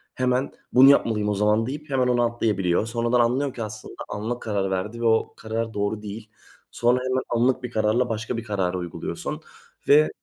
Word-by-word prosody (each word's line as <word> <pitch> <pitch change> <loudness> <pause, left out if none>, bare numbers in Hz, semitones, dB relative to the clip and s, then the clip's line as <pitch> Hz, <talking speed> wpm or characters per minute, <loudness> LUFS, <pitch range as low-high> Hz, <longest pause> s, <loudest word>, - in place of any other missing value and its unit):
hemen 130 +1 0 0.2
bunu 130 +2 +8
yapmalıyım 110 -6 +3
o 105 - 0
zaman 105 +2 +2
deyip 145 +3 -6
hemen 130 -2 +1
ona 120 -1 +3
atlayabiliyor. 105 -5 0
Sonradan 120 +1 0
anlıyor 130 +3 +1
ki 115 - -4
aslında 110 0 -8
anlık 110 +4 -3
o - - -18
kararı 100 -3 -1
verdi 105 +5 -3
ve - - -1
o 110 0 +2
karar 115 0 -3
doğru 105 +1 -2
değil. 105 +1 -8 0.4
Sonra 120 +1 +2
hemen 130 0 0
anlık 125 +2 +1
bir 120 - -5
kararla 110 +3 +1
başka 115 +2 -3
bir 115 - -4
karar 95 -5 -1
uyguluyorsun 90 -2 -5 0.5
ve 150 +2 +6
115 Hz, 190 wpm, -24 LUFS, 105-125 Hz, 0.5 s, bunu